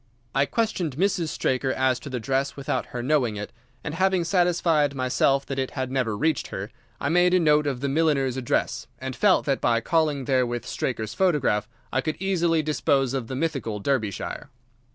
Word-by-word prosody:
I 140 +1 +2
questioned 185 - -1
Mrs. 185 -2 +1
Straker 130 -3 0
as 130 -1 +1
to 140 - -8
the 125 -2 -3
dress 135 +4 -1
without 140 -1 -2
her 120 -1 -5
knowing 130 -5 +1
it, 105 0 -6 0.3
and 150 - -4
having 185 +1 +2
satisfied 165 -5 +2
myself 135 +1 +1
that 135 -1 -4
it 130 - -1
had 130 -1 -2
never 125 -6 0
reached 155 +1 0
her, 100 +3 -6 0.3
I 140 - -1
made 180 +2 +4
a - - +5
note 150 -2 +3
of 130 -3 -2
the 140 - 0
milliner's 140 -3 +1
address, 125 -2 -1
and 130 +1 -5
felt 200 +6 +3
that 135 -3 0
by 115 -1 +3
calling 150 0 +1
there 130 -2 +2
with 120 0 -4
Straker's 110 -4 -3
photograph 130 - +1 0.2
I 130 - +2
could 155 +3 -2
easily 170 -4 +1
dispose 140 -3 +1
of 130 -4 -2
the 130 - -5
mythical 135 -8 -2
Derbyshire. 110 -3 -2
135 Hz, 190 wpm, -25 LUFS, 125-160 Hz, 0.3 s, a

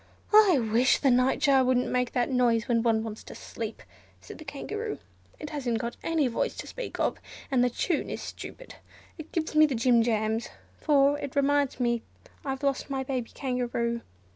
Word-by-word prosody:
"I 420 -7 +7
wish 235 +1 +3
the 275 - +3
Nightjar 265 +2 +4
wouldn't 255 0 +2
make 250 -1 -1
that 245 +1 0
noise 235 -3 +2
when 235 -2 +2
one 225 -1 +2
wants 220 -1 -7
to - - -10
sleep," - - -7 0.4
said - - -12
the - - -8
Kangaroo. 420 +10 -5 0.4
"It 300 - -7
hasn't 255 -6 -1
got 235 +1 -4
any 325 -3 +1
voice 235 - -1
to - - -7
speak - - -7
of, - - 0 0.3
and 255 -2 +3
the 250 - +3
tune 300 +6 -1
is - - -4
stupid. - - -9 0.4
It 315 - -9
gives 325 -1 -2
me 310 0 +6
the 275 - -2
jim 235 0 +4
jams, 220 0 0 0.3
for 285 -1 +3
it 280 -2 -6
reminds 280 -1 +2
me 235 -2 +1 0.4
I've 270 0 -4
lost 275 0 0
my 270 -1 -2
baby 255 -3 -3
Kangaroo. 240 -3 -2
255 Hz, 185 wpm, -28 LUFS, 235-285 Hz, 0.4 s, I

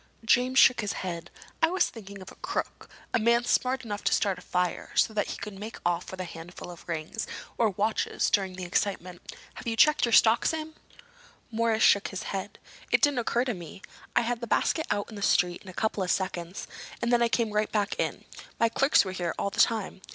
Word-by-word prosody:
James 250 +3 +3
shook 250 -3 +7
his 210 - -2
head. 170 -1 -5 0.3
"I 325 - +6
was 370 +2 +2
thinking 200 -3 -10
of - - -11
a - - -14
crook—a - - -4
man 235 +2 +3
smart 255 +1 +1
enough 205 -2 -5
to - - +3
start 195 -3 +1
a - - -13
fire, 180 -1 -2
so 220 - +3
that 210 - 0
he - - -5
could 200 -2 -7
make 215 +2 -7
off 175 0 0
with 190 - -8
a - - -2
handful 175 +1 -9
of 175 0 -13
rings, 165 +6 -3 0.3
or 230 -2 +3
watches, 210 +3 0
during 190 -2 +1
the 185 - -6
excitement. 180 -1 -2 0.2
Have - - -9
you 225 - 0
checked 300 +4 +5
your 235 - -2
stock, 225 0 +5
Sam?" 315 0 -2 0.8
Morris 225 0 +1
shook 200 - +5
his 190 - -5
head. 195 +1 -5 0.3
"It - - +3
didn't 290 -3 +4
occur 240 +1 +1
to 245 - -1
me. 175 0 -10 0.3
I - - +5
had 240 0 -2
the 235 - -4
basket 315 +7 +1
out 205 - -1
in - - -9
the 200 - -7
street 180 -2 +2
in 195 - -12
a - - -7
couple 215 +2 -1
of 185 - -1
seconds, 180 -1 -2 0.3
and 235 +1 0
then 240 - +4
I 235 - +4
came 230 -2 0
right 210 0 0
back 205 -1 0
in. - - -2 0.3
My 230 - +4
clerks 270 -1 +4
were 190 - -4
here 175 -2 -3
all 200 - -1
the - - -6
time." 215 -4 +1
210 Hz, 225 wpm, -28 LUFS, 185-235 Hz, 0.8 s, shook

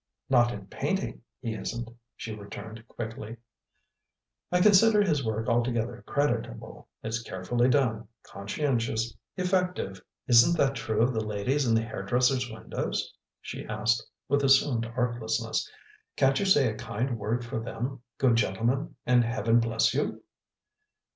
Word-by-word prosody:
"Not 120 -2 +5
in 100 -4 -7
painting, - - -3 0.2
he 115 - -3
isn't," 120 +2 -4 0.3
she 110 - -6
returned 110 +2 -9
quickly, 115 0 -7 1.1
"I 180 - +3
consider 210 +2 +6
his 150 -8 +1
work 110 0 -2
altogether 120 0 0
creditable; 120 - -2 0.2
it's 110 +1 -2
carefully 120 +5 0
done, 120 -6 +1 0.2
conscientious, 115 +1 -2 0.2
effective 180 - -1
" - - -56
"Isn't 125 +8 +6
that 140 -3 +3
true 110 -2 0
of 125 +2 +2
the 110 -1 -1
ladies 115 +7 0
in 115 - +4
the 115 - +2
hairdressers' 125 +4 0
windows?" 110 0 -4 0.3
she - - -6
asked 110 +2 +1 0.2
with 140 +1 +2
assumed 135 -4 +4
artlessness. 115 -2 -1 0.5
"Can't 135 0 +3
you 200 - 0
say 145 -8 +5
a 110 - -8
kind 120 +1 -3
word 115 +4 -1
for 120 -1 -3
them, 125 +3 -5 0.2
good 125 -4 +3
gentleman, 115 +8 0
and 125 -1 +4
heaven 115 0 +2
bless 115 -1 +2
you?" - - -2
120 Hz, 140 wpm, -28 LUFS, 110-130 Hz, 1.1 s, consider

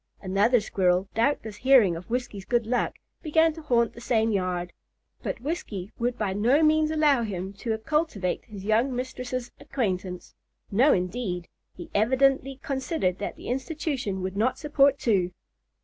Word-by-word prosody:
Another 205 +6 +3
squirrel, 185 -2 +1
doubtless 225 -3 0
hearing 245 -9 +5
of 170 +5 -9
Whiskey's 240 -5 -3
good 235 +3 0
luck, 245 +2 0 0.3
began 320 0 +3
to 320 - -9
haunt 235 -6 +2
the 235 - -11
same 225 -2 +1
yard; 180 -3 -1 0.5
but - - -4
Whiskey 225 - -4
would 240 +1 -1
by 205 -3 -1
no 245 +10 +3
means 310 0 +4
allow 305 -5 +3
him 195 -3 -4
to 225 -2 -1
cultivate 220 - -1
his 205 -4 -9
young 230 +5 +2
mistress's 250 -1 -4
acquaintance. 185 -8 -3 0.4
No 250 +9 +5
indeed! 180 -1 -1 0.3
he 175 - -10
evidently 265 +4 +2
considered 265 - -1
that 205 - -4
the - - -11
institution 260 - -2
would 190 +1 -3
not 230 +5 +1
support 285 -2 +3
two. 185 -8 +1
235 Hz, 150 wpm, -26 LUFS, 195-270 Hz, 0.5 s, hearing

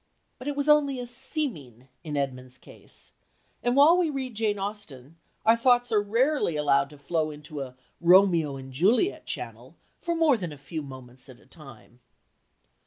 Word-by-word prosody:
But 255 - -8
it 290 - -2
was 285 0 -2
only 295 -3 +4
a 245 - -4
"seeming" 240 - -4 0.2
in 150 -2 -4
Edmund's 130 -2 -4
case, - - -13 0.5
and 245 +1 0
while 295 +5 +7
we 355 -3 +1
read 265 -4 -4
Jane 215 -1 -1
Austen 180 -8 -7 0.3
our 225 +1 +6
thoughts 245 +1 +2
are 210 -2 +3
rarely 230 - +1
allowed 140 -2 +2
to 150 - -14
flow 155 +2 -1
into 150 0 -8
a 130 -2 -7 0.2
"Romeo 170 -4 +4
and 135 0 -10
Juliet" 215 - +1
channel - - -7 0.2
for 340 0 -2
more 320 -6 +3
than 180 -6 -5
a 145 - -10
few 155 +3 -6
moments 130 -2 -11
at 125 - -14
a - - -23
time. 135 -4 -15
175 Hz, 175 wpm, -26 LUFS, -, 0.5 s, while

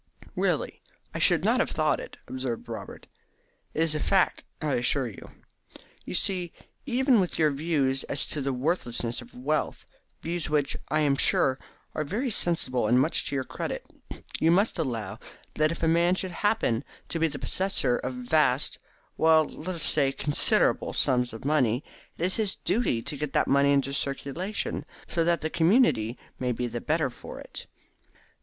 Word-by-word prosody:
"Really, - - -1 0.3
I - - -3
should - - +4
not - - +3
have - - 0
though - - +2
it," - - -4
observed 130 -3 -4
Robert. - - -8 0.7
"It 160 - +2
is 165 -2 +1
a 155 - -1
fact, 190 +4 +2 0.2
I 150 -3 -1
assure 125 +2 +1
you. 110 - -10 0.8
You - - -4
see, 180 -2 0 0.3
even 260 -1 +3
with 180 -2 -1
your 155 -2 +3
views 140 -3 0
as 140 - 0
to 150 - -3
the 135 0 -1
worthlessness 125 -4 -2
of 120 - -15
wealth, 145 +5 -2 0.4
views 170 -1 -3
which, 150 -2 +1
I 155 - +2
am 140 -2 +2
sure, 130 -1 +3 0.3
are 155 - -1
very 230 - -2
sensible 130 - +1
and 120 +3 +4
much 130 - +2
to - - -3
your 135 - 0
credit, - - -5 0.5
you 160 - +3
must 195 +2 +2
allow 115 -10 -3 0.3
that 155 +1 +2
if 165 - -6
a - - +3
man 170 +2 +3
should 185 -1 -4
happen 175 - 0 0.3
to 165 - -2
be 165 - +3
the 145 -2 -5
possessor 185 -11 +1
of 130 0 -4
vast 130 +1 +1 0.4
well, 160 -1 +5
let 180 +5 -6
us 165 - -1
say 145 -3 +4
of 135 - -8
considerable 145 -1 +2
sums 125 -1 +2
of 115 +3 -9
money, 130 -4 +2 0.3
it 170 - 0
is 185 - +2
his 215 -4 +1
duty 195 - 0
to 145 - -3
get 150 -1 -4
that - - +3
money 140 +1 +4
into 140 -1 +1
circulation, 150 +7 -2 0.2
so 165 - 0
that 170 0 +1
the 160 - -2
community 165 - +3 0.2
may 125 -1 0
be 125 +1 -2
the 120 0 -4
better 155 -4 0
for - - -10
it. - - -9
150 Hz, 180 wpm, -27 LUFS, 130-170 Hz, 0.8 s, well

